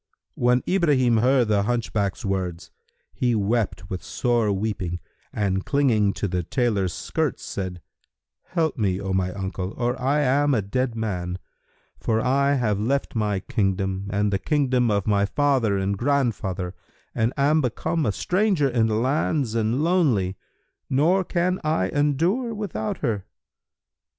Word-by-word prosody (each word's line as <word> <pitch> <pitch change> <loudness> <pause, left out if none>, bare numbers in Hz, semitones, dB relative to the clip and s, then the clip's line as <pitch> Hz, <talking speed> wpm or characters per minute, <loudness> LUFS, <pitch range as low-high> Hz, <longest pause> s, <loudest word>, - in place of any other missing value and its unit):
When 125 +1 +2
Ibrahim 145 -11 +3
heard 125 0 +3
the 105 -2 +3
hunchback's 105 -1 -1
words, 90 -3 -3 0.4
he 120 -2 +1
wept 105 -2 -1
with 95 -1 -5
sore 120 -4 0
weeping 95 -4 -2 0.3
and 95 -2 -1
clinging 115 -8 +2
to 100 - -2
the 90 -1 -1
tailor's 100 -2 0
skirts - - -2
said, 90 -3 -5 0.6
"Help 160 -6 -1
me, 95 -3 +1
O 95 -1 -3
my 95 -1 0
uncle, 95 0 -4
or 125 +1 -1
I 140 +3 +2
am 145 +1 +3
a 110 - 0
dead 125 +4 -1
man; 90 -5 -3 0.6
for 110 -1 0
I 140 +4 +2
have 105 -6 0
left 135 +6 -1
my 105 -4 0
kingdom 95 -1 -1
and 105 0 +1
the 95 - +1
kingdom 130 -4 +1
of 100 -2 +1
my 100 -1 +2
father 130 -7 +2
and 95 +1 0
grandfather 105 -8 -1 0.4
and 110 +2 +1
am 150 +3 +3
become 150 +5 -1
a - - +2
stranger 180 - +1
in 120 -3 +2
the 110 - 0
lands 130 +1 0
and 115 +5 0
lonely; 135 - +2 0.5
nor 165 +8 +3
can 180 +1 0
I 155 -12 +1
endure 170 - +1
without 170 - -3
her." 105 -6 -1
115 Hz, 145 wpm, -24 LUFS, 100-140 Hz, 0.6 s, Ibrahim